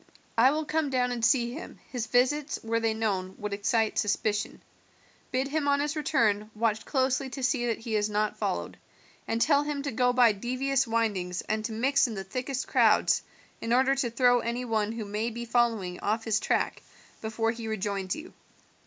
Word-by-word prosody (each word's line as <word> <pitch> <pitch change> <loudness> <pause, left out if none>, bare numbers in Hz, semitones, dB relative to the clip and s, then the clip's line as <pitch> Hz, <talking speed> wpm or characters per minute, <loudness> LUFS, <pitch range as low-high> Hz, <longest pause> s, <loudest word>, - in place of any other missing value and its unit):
I 235 +3 +6
will 305 +2 -1
come 310 -1 0
down 250 -2 +1
and 240 -2 -3
see 240 -1 +3
him; 320 - -9
his 240 -3 -3
visits, 275 +4 +1
were 230 0 0
they 225 -1 0
known, 190 -4 -2
would 210 -1 -4
excite 215 +2 +1
suspicion. 210 0 -1 0.7
Bid 260 +2 0
him 300 0 -1
on 280 0 +3
his 295 +2 -1
return 230 -9 +1
watch 220 -1 0
closely 265 -1 0
to 265 +1 -6
see 250 -1 +1
that 230 - 0
he 225 -1 -4
is 210 0 +1
not 210 0 0
followed, - - -3 0.5
and 225 - 0
tell 285 +3 +4
him 290 -1 -3
to 280 - -2
go 250 +2 +2
by 245 -2 +5
devious 255 +5 0
windings 205 -6 -1
and 215 0 -2
to 225 - -3
mix 270 +5 +2
in 225 - -5
the 195 - -4
thickest 255 +6 -4
crowds - - +4 0.4
in 230 - -3
order 260 +2 +4
to 270 -3 0
throw 245 +1 +4
any 240 +2 -3
one 220 -2 0
who 225 -1 -5
may 210 +3 -2
be 235 +1 -6
following 225 -7 0
off 220 +2 -1
his 220 -1 +1
track - - 0 0.4
before 225 +1 0
he 230 -1 -6
rejoins 200 -3 -2
you. 315 +3 -10
235 Hz, 195 wpm, -28 LUFS, 215-265 Hz, 0.7 s, I